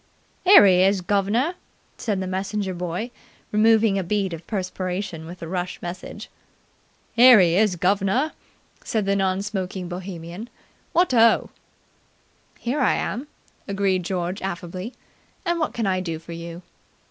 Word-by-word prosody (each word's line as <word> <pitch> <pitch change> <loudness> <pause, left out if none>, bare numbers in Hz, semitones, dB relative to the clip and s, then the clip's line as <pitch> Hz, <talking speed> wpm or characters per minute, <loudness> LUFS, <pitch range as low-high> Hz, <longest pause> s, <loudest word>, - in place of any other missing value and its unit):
"Here 375 - +9
he 185 -2 +5
is, 195 0 +3
guv'nor," 205 - +1 0.4
said 205 -5 -2
the - - -2
messenger 190 +1 -2
boy, 180 +7 -4 0.4
removing 220 -1 +4
a - - -2
bead 195 0 -1
of 165 0 -9
perspiration 185 -4 -4
with 175 +2 -9
the 165 - -5
rush 180 +1 -3
message. 175 +1 -7 0.9
"Here 245 -1 +8
he 170 -2 +4
is, 205 -1 +3
guv'nor," 195 - +1 0.5
said 215 -3 -1
the 200 0 +1
non 190 0 0
smoking 190 -3 -4
Bohemian. 180 +3 -7 0.4
"What 350 -4 +2
oh!" 230 -1 +4 1.1
"Here 250 +5 -2
I 255 - +3
am!" 260 +6 -3 0.4
agreed 195 -2 +1
George 180 +1 -3
affably. 185 +4 -5 0.5
"And 345 -1 0
what 310 - 0
can 230 - -2
I 185 -1 +1
do 165 -3 -3
for 165 +2 -12
you?" 170 +1 -7
190 Hz, 145 wpm, -23 LUFS, 180-215 Hz, 1.1 s, Here